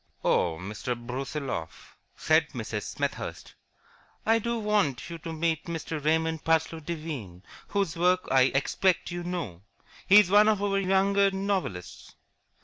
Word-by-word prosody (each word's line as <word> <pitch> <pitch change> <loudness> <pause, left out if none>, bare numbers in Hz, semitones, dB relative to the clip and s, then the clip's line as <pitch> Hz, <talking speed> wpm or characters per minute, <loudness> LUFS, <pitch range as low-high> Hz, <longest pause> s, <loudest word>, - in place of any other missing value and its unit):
"Oh, 85 -2 +2
Mr. 105 +6 -4
Brusiloff," 125 - -5 0.2
said - - +2
Mrs. - - -5
Smethurst, - - -4 0.7
"I 225 +1 +4
do 235 +2 -2
so - - -2
want 205 - 0
you 165 - -6
to 165 - -6
meet 160 0 -1
Mr. 165 -2 -4
Raymond 160 +1 +1
Parsloe 160 0 +1
Devine, 145 - -6 0.2
whose 200 -5 -1
work 180 +2 +2
I 130 -1 +5
expect 180 +7 +1
you 175 0 -4
know. 165 - -4 0.5
He 205 +2 +9
is 190 -3 +2
one 210 +1 +7
of 215 -2 +3
our 195 -1 +1
younger 195 +1 +3
novelists." 190 - -4
165 Hz, 140 wpm, -27 LUFS, 135-195 Hz, 0.7 s, He